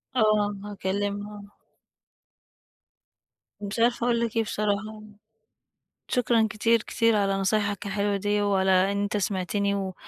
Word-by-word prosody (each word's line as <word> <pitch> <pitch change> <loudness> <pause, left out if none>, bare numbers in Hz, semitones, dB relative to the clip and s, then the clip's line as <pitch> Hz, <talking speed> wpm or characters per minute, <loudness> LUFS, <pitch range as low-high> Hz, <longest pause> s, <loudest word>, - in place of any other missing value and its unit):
آه، 210 -3 +2
هاكلمها. 205 +1 -4 2.2
مش 205 +2 -4
عارفة 235 +1 +2
أقول 235 -1 +2
لك 230 -1 -2
إيه 225 - +3
بصراحة. 215 +1 -3 1.1
شكرًا 235 -2 +2
كتير، 230 +1 +2
كتير 230 -1 +1
على 200 -1 +1
نصايحك 205 +1 0
الحلوة 200 0 -1
دي، 205 +1 0
وعلى 195 -2 +2 0.2
إن 200 0 -1
أنت 205 +1 -1
سمَعتني 200 +1 -1
و 190 -2 -3
205 Hz, 120 wpm, -26 LUFS, 200-215 Hz, 2.2 s, إيه